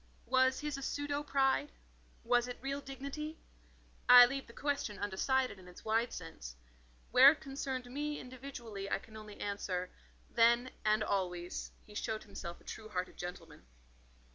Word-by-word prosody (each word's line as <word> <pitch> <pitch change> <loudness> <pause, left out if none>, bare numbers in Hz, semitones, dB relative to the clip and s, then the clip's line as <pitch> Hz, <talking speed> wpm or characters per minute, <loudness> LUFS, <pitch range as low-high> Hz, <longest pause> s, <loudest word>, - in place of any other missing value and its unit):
Was 260 +2 +3
his 300 -2 -3
a - - -8
pseudo 290 +1 -2
pride? 275 0 +2 0.5
was 245 +1 +3
it 245 - -5
real 275 +1 -3
dignity? 280 +4 -6 0.7
I 245 0 +12
leave 275 +2 -3
the - - -12
question 280 -5 -2
undecided 230 +4 0
in 180 - -14
its 180 - -13
wide 225 +2 +2
sense. 160 - -8 0.6
Where 270 +3 +9
it 305 - -14
concerned 270 -2 -4
me 295 +4 -3
individually 245 -6 -7
I - - +1
can 220 +2 -15
only 215 -1 -10
answer: 185 -3 -3 0.4
then, 235 +2 +4
and 215 0 +3
always, 180 -3 -2
he 210 - -14
showed 220 +1 -3
himself 185 -4 -7
a - - -21
true 215 -1 -8
hearted 185 -3 -3
gentleman. 175 -3 -7
240 Hz, 155 wpm, -34 LUFS, 200-270 Hz, 0.7 s, I